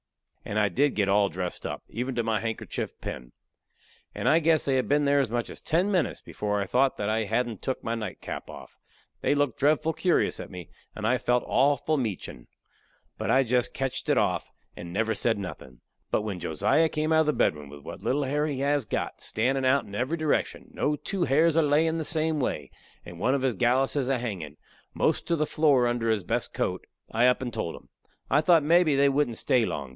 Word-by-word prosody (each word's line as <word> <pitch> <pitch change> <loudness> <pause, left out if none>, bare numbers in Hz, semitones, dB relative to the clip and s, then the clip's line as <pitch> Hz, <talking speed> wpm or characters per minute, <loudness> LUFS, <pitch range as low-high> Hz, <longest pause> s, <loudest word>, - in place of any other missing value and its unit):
And 105 - -4
I 105 -2 +3
did 140 +11 +1
get 100 -2 +1
all 100 0 +3
dressed 90 0 -4
up, - - -6
even 125 +3 -4
to 120 - 0
my 110 -1 0
handkerchief 110 -1 -4
pin. - - -7 0.8
And - - -2
I 160 - +5
guess 160 -1 +2
they 135 - +1
had 130 - 0
been 145 +1 +3
there 140 0 +3
as 135 - +1
much 120 +1 -2
as - - -11
ten 180 +6 +1
minutes 180 -6 0
before 105 -1 -3
I 100 - -1
thought 130 +6 +2
that 105 - -2
I 110 0 0
hadn't 120 0 -1
took 130 - -3
my 115 - -2
nightcap 110 -4 -6
off. - - -11 0.5
They - - +2
looked 145 -5 0
dreadful 155 +3 +2
curious 180 +1 +1
at - - -7
me, 90 -3 -9 0.3
and 110 - -5
I 125 +3 +2
felt 125 0 +1
awful 145 +3 +2
meachin'. 105 - -4 0.7
But - - -2
I 135 - +5
jest 125 0 0
ketched 135 -1 -3
it - - +3
off, - - 0 0.2
and 85 0 -8
never 110 +4 0
said 115 +1 0
nothin'. 65 -10 -8 0.3
But 105 - 0
when 100 -4 -4
Josiah 135 - +2
come 155 +1 0
out 160 - +5
of - - +1
the 150 - +3
bedroom 75 - 0
with 70 0 -12
what - - -8
little 145 +3 0
hair 145 +3 0
he 140 -3 -3
has 145 0 +1
got - - -3
standin' 130 +5 0
out 130 +2 +3
in 100 - -12
every 130 +10 -1
direction, 155 -2 -1
no 150 - 0
two 185 +4 -2
hairs 155 +4 +3
a 165 - +5
layin' 160 +2 +2
the - - -2
same 160 0 0
way, 75 - -2 0.3
and 85 -1 -10
one 130 +8 +2
of 135 - -2
his 130 -4 +1
galluses 130 +4 +1
a 135 - +2
hangin' 95 -11 -5 0.4
most - - 0
to 170 - +2
the 155 -1 0
floor 145 -5 +3
under 120 -1 0
his 110 -3 +1
best - - -1
coat, - - -2 0.2
I 120 +3 +3
up 125 +1 +2
and 120 -2 -5
told 95 -7 -3
'em. - - -15 0.4
I 145 - +5
thought 165 -1 +4
mebby 165 -1 +4
they 140 +1 +4
wouldn't 140 -4 +1
stay 125 -5 +2
long. 70 -9 -4
130 Hz, 220 wpm, -27 LUFS, 110-145 Hz, 0.8 s, I